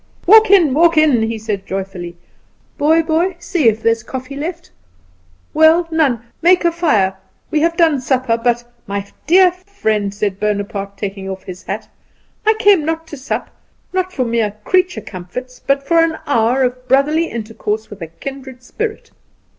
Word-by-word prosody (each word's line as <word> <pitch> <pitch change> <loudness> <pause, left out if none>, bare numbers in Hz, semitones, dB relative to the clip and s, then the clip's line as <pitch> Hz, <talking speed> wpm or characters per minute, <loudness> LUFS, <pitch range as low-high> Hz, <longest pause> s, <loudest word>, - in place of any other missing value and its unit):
"Walk 440 +4 +7
in, 350 -9 +5
walk 330 +2 +4
in," 300 -7 +4
he 225 0 -1
said 210 -3 -4
joyfully. 190 -3 -5 0.6
"Boy, 320 +3 +3
boy, 335 +3 0
see 340 -5 0
if 220 0 -3
there 230 - +4
is 230 0 -2
any 230 - -25
coffee 260 +1 -6
left. 330 +4 -6 0.8
Well, 320 +2 +5
none. 280 -8 +1 0.2
Make 360 +1 +4
a 340 - +4
fire. 220 - +1 0.4
We 310 - +2
have 335 +2 +1
done 320 -6 +3
supper, 255 -2 +1
but 240 +1 0 0.2
" - - -39
"My 200 0 -3 0.2
dear 365 +2 +6
friend," 345 - -2
said 200 -1 -3
Bonaparte, 200 -1 -3
taking 195 -1 -5
off 190 0 -6
his 185 0 -9
hat, - - -5 0.6
"I 435 - +5
came 400 -6 +4
not 325 +1 -2
to 300 - -7
sup, 265 - -4 0.4
not 370 0 -1
for 260 -8 -1
mere 230 -3 -1
creature 370 - +1
comforts, 205 +8 -8
but 275 0 0
for 335 -1 +4
an 325 -1 -1
hour 245 0 +2
of 250 0 -2
brotherly 290 +6 +3
intercourse 220 -1 -4
with 205 -2 -10
a 165 - -5
kindred 260 - -9
spirit. 435 - -5
260 Hz, 175 wpm, -17 LUFS, 215-330 Hz, 0.8 s, Walk